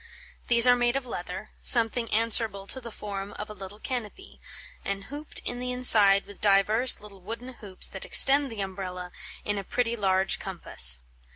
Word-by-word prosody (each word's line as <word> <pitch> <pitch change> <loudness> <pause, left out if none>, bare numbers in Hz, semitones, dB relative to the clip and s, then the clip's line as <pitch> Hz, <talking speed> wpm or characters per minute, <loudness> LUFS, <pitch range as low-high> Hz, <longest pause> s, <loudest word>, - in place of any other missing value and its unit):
These 235 0 +5
are 245 0 +5
made 245 0 -1
of 275 -1 -3
leather, 185 -2 -8
something 230 -1 +2
answerable 220 -3 +1
to 260 +6 -3
the 235 - -9
forme 200 -1 -8
of 210 +1 -9
a - - -8
little 195 0 -11
cannopy, 250 - -8 0.3
& - - -30 0.3
hooped 295 +2 -7
in 245 - -4
the 250 0 -5
inside 210 -6 +4
with 205 0 -15
divers 210 +5 +4
little 200 -2 -15
wooden 230 +6 -9
hoopes 200 -6 -3
that - - -10
extend 280 0 +6
the 215 -3 -6
umbrella 185 -2 -7 0.3
in 205 -1 -3
a - - -7
pretty 235 +3 -3
large 190 -3 0
cornpasse. 65 - +2
210 Hz, 175 wpm, -25 LUFS, 195-245 Hz, 0.3 s, extend